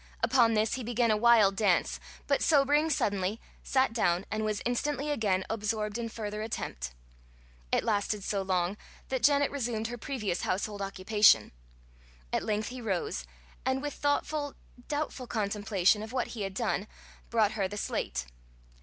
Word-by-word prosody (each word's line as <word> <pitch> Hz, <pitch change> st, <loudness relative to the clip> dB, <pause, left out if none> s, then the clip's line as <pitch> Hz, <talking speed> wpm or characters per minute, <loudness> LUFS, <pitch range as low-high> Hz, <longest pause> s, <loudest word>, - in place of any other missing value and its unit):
Upon 235 Hz, -4 st, +4 dB
this 215 Hz, +1 st, +2 dB
he 255 Hz, -, -3 dB
began 235 Hz, 0 st, +1 dB
a -, -, +4 dB
wild 215 Hz, -3 st, +5 dB
dance, 195 Hz, -3 st, +2 dB, 0.3 s
but 280 Hz, -, +1 dB
sobering 295 Hz, +1 st, +4 dB
suddenly, 200 Hz, -6 st, 0 dB, 0.2 s
sat 260 Hz, -3 st, +1 dB
down, 180 Hz, -5 st, +1 dB
and 215 Hz, 0 st, -1 dB
was 215 Hz, -1 st, -1 dB
instantly 285 Hz, +4 st, -1 dB
again 200 Hz, -8 st, +1 dB
absorbed 215 Hz, 0 st, -2 dB
in 230 Hz, -1 st, -3 dB
further 210 Hz, -1 st, -5 dB
attempt. 60 Hz, -, -4 dB, 0.8 s
It -, -, +2 dB
lasted 210 Hz, -2 st, 0 dB
so 200 Hz, 0 st, -1 dB
long 185 Hz, 0 st, 0 dB, 0.3 s
that 260 Hz, -2 st, -1 dB
Janet 285 Hz, -1 st, +4 dB
resumed 235 Hz, -5 st, -2 dB
her 240 Hz, 0 st, -6 dB
previous 215 Hz, -, -2 dB
household 205 Hz, +2 st, -2 dB
occupation. 200 Hz, +2 st, +4 dB, 0.8 s
At -, -, +2 dB
length 215 Hz, 0 st, -1 dB
he 250 Hz, 0 st, -7 dB
rose, 180 Hz, -, -2 dB, 0.4 s
and 260 Hz, +1 st, +1 dB
with 290 Hz, +1 st, -4 dB
thoughtful, 290 Hz, 0 st, -1 dB, 0.3 s
doubtful 290 Hz, -4 st, -3 dB
contemplation 205 Hz, -2 st, +1 dB
of 220 Hz, +1 st, -7 dB
what 255 Hz, -1 st, -1 dB
he 225 Hz, -, -6 dB
had 195 Hz, -1 st, -3 dB
done, 215 Hz, -3 st, -1 dB, 0.4 s
brought 220 Hz, -3 st, +3 dB
her 200 Hz, -3 st, -1 dB
the 205 Hz, +2 st, -7 dB
slate. 60 Hz, -, -2 dB
220 Hz, 155 wpm, -30 LUFS, 200-250 Hz, 0.8 s, wild